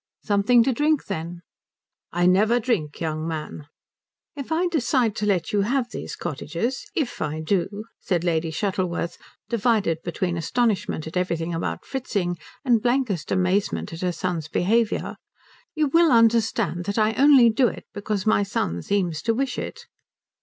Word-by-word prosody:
"Something 215 +3 +4
to 265 - +1
drink, 300 +4 +1
then?" 170 -2 -5 0.7
"I 175 +1 +1
never 210 +6 +4
drink, 210 - -1
young 155 -1 -2
man." 155 -2 -5 0.7
"If 280 +1 -7
I 330 +3 +2
decide 255 - +1
to 210 - -1
let 180 -5 +1
you 205 - +3
have 245 +3 0
these - - -6
cottages 175 - -3
if 300 -9 -2
I 155 0 -2
do," 195 +5 -1 0.2
said 175 -3 -1
Lady 165 -2 0
Shuttleworth, 185 -1 -2 0.3
divided 215 -7 +1
between 175 0 -2
astonishment 200 -2 0
at 160 +3 -5
everything 170 -2 -1
about 165 - -3
Fritzing 200 - -2 0.3
and 235 -4 +4
blankest 240 - 0
amazement 185 0 0
at 165 - -7
her 180 -1 0
son's 170 -2 -3
behaviour, 220 +7 0 0.6
"you 310 -1 +2
will 335 +2 +4
understand 230 -5 +3
that 200 +1 -3
I 215 0 +3
only 265 -3 +6
do 245 +3 +3
it - - -6
because 205 -1 -3
my 215 -1 +3
son 85 - -2
seems 175 - -1
to 230 -1 0
wish 265 +1 -1
it." - - -7
200 Hz, 155 wpm, -24 LUFS, 170-235 Hz, 0.7 s, only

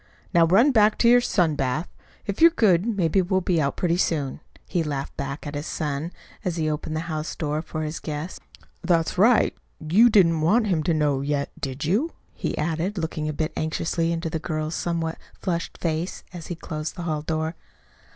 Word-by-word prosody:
"Now 170 -2 +5
run 225 - +5
back 215 -3 +4
to 235 - +3
your 245 +1 +7
sun 180 -9 +2
bath. 145 +4 -1 0.4
If 200 +5 -4
you're 335 - +10
good 205 - +3
maybe 190 -4 +2
we'll 190 +1 +1
be 175 -3 +1
out 140 -1 -1
pretty 175 -1 +1
soon," 145 -7 0 0.3
he 175 - 0
laughed 145 -3 -3
back 140 +3 -5
at 145 - -5
his 145 +2 -4
son, 150 +1 -3 0.3
as 180 -4 -1
he 160 -2 -1
opened 155 +1 -2
the 160 - -1
house 155 -2 -4
door 150 -1 -2
for 155 -1 -5
his 155 +1 -4
guest. 155 +3 -5 0.4
"That's 170 0 +1
right 230 +3 +5 0.2
you 190 +10 +5
didn't 170 -7 +4
want 215 +9 +3
him 180 -6 +1
to 170 - +2
know, 145 -3 +1
yet, 140 0 -1
did 135 +2 -3
you?" 225 - +1 0.2
he - - -3
added, 165 +6 -1
looking 160 -2 -2
a - - 0
bit 155 +1 -2
anxiously 165 +1 -1
into 165 -1 -2
the 160 - -2
girl's 155 -1 -3
somewhat 165 -1 -2 0.2
flushed 170 -3 -3
face 165 +1 -2
as 175 -2 -8
he 175 - -4
closed 155 -1 -5
the 175 - -6
hall 155 -3 -1
door. 160 +1 -2
165 Hz, 200 wpm, -24 LUFS, 155-180 Hz, 0.4 s, you're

